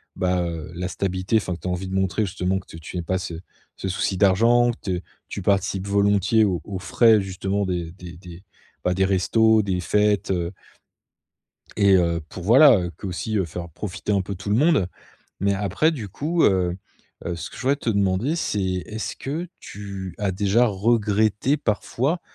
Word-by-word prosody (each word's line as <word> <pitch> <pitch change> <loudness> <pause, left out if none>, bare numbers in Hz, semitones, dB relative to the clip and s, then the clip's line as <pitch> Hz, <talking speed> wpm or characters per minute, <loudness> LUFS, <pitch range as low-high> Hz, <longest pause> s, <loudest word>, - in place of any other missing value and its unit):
bah, 90 -1 +1
heu, 80 -2 -5
la 90 +1 -3
stabilité, 95 +4 0
enfin 95 -4 -2
que - - -13
tu - - -5
as - - 0
envie 90 +1 -3
de 95 - -3
montrer 95 +3 +1
justement 95 0 -1
que 95 - -17
tu 80 - -10
tu 80 +3 -7
aie - - -1
pas 95 +3 -1
ce 90 - -5 0.4
ce 95 - -4
souci 95 +1 -1
d'argent, 115 +5 +4
que 120 - -10
te 90 -4 -3 0.3
tu - - -5
participes 95 0 0
volontiers 100 +2 +3
aux 90 -5 -1
aux 100 -2 -5
frais 110 +4 +4
justement 95 +1 -2
des 90 -3 -3
des 90 -3 -11
des, 90 +1 -12 0.4
bah, 90 - +1
des 95 +1 +2
restos, 110 +3 +3
des 95 -2 -1
fêtes 105 +2 +1
heu 85 -2 -1 1.3
et 100 -2 +4
heu, 85 -2 +1
pour, 90 - -8
voilà, 125 0 +7 0.2
que 100 - -7
aussi 105 +4 -3
faire 85 +2 -6
profiter 95 +5 -6
un 100 - +2
peu 100 +2 -5
tout 95 +2 -8
le 105 - +3
monde. 145 - +3 0.5
Mais 100 0 +2
après 100 - +1
du 115 -9 -6
coup, 160 - -1
heu, 90 -2 +2 0.5
heu, 85 - -2
ce 85 - -6
que - - -12
je - - -8
voudrais 135 +2 +2
te 120 - -2
demander 100 - +1
c'est 105 -10 -1 0.3
est-ce 110 0 -5
que 155 +6 -4
tu 100 -2 -7
as 100 -2 0
déjà 105 +5 +3
regretté 110 +4 +1
parfois, 135 - -1
100 Hz, 195 wpm, -23 LUFS, 90-110 Hz, 1.3 s, voilà